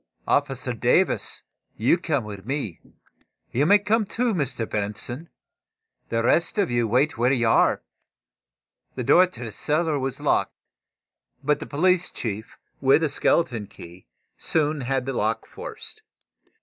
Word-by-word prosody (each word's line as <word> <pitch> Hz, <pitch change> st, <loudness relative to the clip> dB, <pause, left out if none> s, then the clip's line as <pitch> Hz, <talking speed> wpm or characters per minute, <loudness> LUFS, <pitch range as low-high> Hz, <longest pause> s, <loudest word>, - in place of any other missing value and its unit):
"Officer -, -, 0 dB
Davis, -, -, +1 dB, 0.3 s
you 115 Hz, +9 st, +4 dB
come 155 Hz, -8 st, -1 dB
with 100 Hz, -2 st, -8 dB
me. 130 Hz, -, -3 dB, 0.7 s
You 145 Hz, +5 st, +2 dB
may 205 Hz, +3 st, +7 dB
come, 215 Hz, +2 st, +1 dB
too, 235 Hz, +3 st, 0 dB
Mr. 130 Hz, -, -2 dB
Benson. 110 Hz, +9 st, -4 dB, 0.8 s
The 115 Hz, 0 st, 0 dB
rest 170 Hz, -, +2 dB
of 200 Hz, -8 st, +1 dB
you 120 Hz, -1 st, +1 dB
wait 125 Hz, +4 st, +1 dB
where 125 Hz, +2 st, +3 dB
you 120 Hz, -4 st, +2 dB
are." 110 Hz, -, +3 dB, 1.1 s
The 125 Hz, -, -3 dB
door 180 Hz, +9 st, +6 dB
to 180 Hz, -8 st, -10 dB
the 115 Hz, -, -5 dB
cellar 155 Hz, +4 st, 0 dB
was 135 Hz, 0 st, -3 dB
locked, -, -, +1 dB, 0.9 s
but 150 Hz, +1 st, +2 dB
the -, -, -7 dB
police 180 Hz, +4 st, +2 dB
chief, 110 Hz, -2 st, -5 dB, 0.2 s
with 135 Hz, +4 st, +4 dB
a 155 Hz, -, +2 dB
skeleton 120 Hz, -9 st, +1 dB
key, 90 Hz, -2 st, -13 dB, 0.3 s
soon 150 Hz, -2 st, +1 dB
had 130 Hz, 0 st, -1 dB
the 135 Hz, -, -2 dB
lock 110 Hz, -1 st, -1 dB
forced. 445 Hz, -1 st, -8 dB
135 Hz, 145 wpm, -24 LUFS, 115-165 Hz, 1.1 s, may